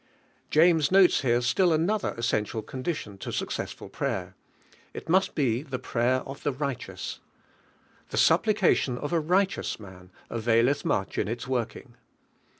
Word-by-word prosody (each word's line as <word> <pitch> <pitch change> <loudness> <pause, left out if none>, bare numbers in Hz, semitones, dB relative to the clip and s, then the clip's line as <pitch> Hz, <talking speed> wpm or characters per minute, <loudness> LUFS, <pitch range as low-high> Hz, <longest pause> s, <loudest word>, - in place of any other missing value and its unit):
James 160 -1 +4
notes 190 -2 +5
here 120 -2 +2
still 170 +9 +2
another 180 +7 0
essen 115 -2 +1
tial 110 0 -6
condition 130 - -5
to - - -5
successful - - -4
prayer: - - -3 0.6
it - - -7
must 190 +4 +2
he 125 -5 +1
the 135 -4 -5
prayer 125 +1 0
of 135 0 -9
the 145 - 0
righteous, 140 -1 -5 0.9
"The - - -4
supplication 175 - +3
of 145 +6 -4
a, 170 - +3
righteous 185 +2 0
man 95 -3 -13 0.2
availeih 115 +4 +2
much 95 - -1
in 100 - 0
its 115 +3 -4
working." 120 0 -3
130 Hz, 145 wpm, -27 LUFS, 115-165 Hz, 0.9 s, notes